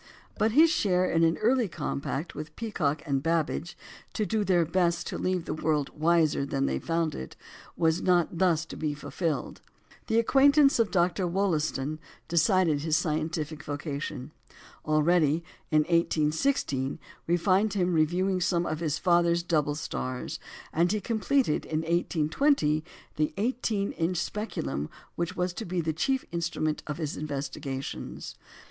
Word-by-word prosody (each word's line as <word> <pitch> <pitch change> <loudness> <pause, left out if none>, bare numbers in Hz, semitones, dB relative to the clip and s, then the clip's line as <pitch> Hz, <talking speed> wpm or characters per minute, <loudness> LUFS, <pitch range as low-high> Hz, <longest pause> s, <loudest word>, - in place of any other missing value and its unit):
But 220 0 +2
his 315 +4 +6
share 185 - +2
in 165 -2 +2
an 165 0 +3
early 240 +1 +2
compact 150 -1 -4
with 155 +1 -8
Peacock 155 -10 -1
and 140 -3 0
Babbage, 165 +2 -1 0.4
"to 215 - 0
do 220 0 0
their 175 -3 +3
best 170 0 +1
to - - -4
leave 185 -2 -1
the - - -3
world 155 -2 0
wiser 160 -2 +2
than 135 0 -1
they - - -1
found 165 -2 -1
it," 65 - -7 0.4
was 165 +1 +2
not 175 -2 +2
thus 170 -3 +3
to - - -9
be 150 -2 -2
fulfilled. 155 0 -3 0.5
The 225 - +1
acquaintance 275 +3 +5
of 230 - +3
Dr. 180 0 +1
Wollaston 155 -5 -1 0.3
decided 165 -2 +3
his 160 +1 +2
scientific 155 -1 -2
vocation. 145 -2 -5 0.5
Already, 155 +1 +3 0.3
in 155 -1 +4
1816, 155 - +1 0.3
we 175 +1 +3
find 195 +4 +2
him 180 -3 +1
reviewing 180 +4 +1
some 175 -1 +1
of 155 - -2
his 155 -3 -1
father's 170 -1 +3
double 150 -4 +1
stars; 130 -4 -4 0.3
and 170 +3 +2
he 215 - 0
completed 230 - +1
in 155 0 -2
1820 160 - +1 0.3
the 155 0 0
18 220 -2 -1
inch 175 +2 -1
speculum 75 - -3 0.2
which 170 +2 -3
was 180 0 -1
to 225 - -5
be 180 -2 -2
the 160 -1 -1
chief 265 - 0
instrument 165 -2 -1
of 150 -1 -3
his 155 -3 -3
investigations. 140 -2 -5
170 Hz, 150 wpm, -28 LUFS, 150-185 Hz, 0.5 s, his